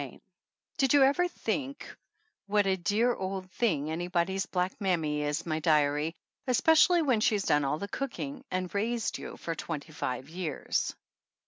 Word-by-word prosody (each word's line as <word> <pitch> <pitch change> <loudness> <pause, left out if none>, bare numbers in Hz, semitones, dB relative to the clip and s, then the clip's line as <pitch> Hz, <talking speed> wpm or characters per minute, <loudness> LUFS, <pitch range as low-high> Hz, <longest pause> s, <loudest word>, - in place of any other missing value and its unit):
88 - - -5
CHAPTER - - -18
V - - -46
DID - - +2
you 285 -2 +7
ever 285 +7 +4
think 280 -3 -4 0.5
what 205 0 +3
a 190 -1 +2
dear 205 +7 +2
old 190 -2 -5
thing 160 -11 0
anybody's 175 +3 -1
black 180 0 0
mammy 160 -6 0
is, 150 +2 -2
my 155 -2 -1
diary, 150 0 +2 0.3
especially 320 +6 +5
when 255 -7 +2
she's 210 -2 +2
done 150 -5 +3
all 140 +2 0
the 200 - -5
cooking 275 +3 -5
(and 185 -1 -3
raised 225 +2 -1
you) - - -8
for 165 - -4
twenty 160 -1 -5
five 130 -2 -3
years? 165 -3 -2
185 Hz, 165 wpm, -29 LUFS, 160-235 Hz, 0.5 s, you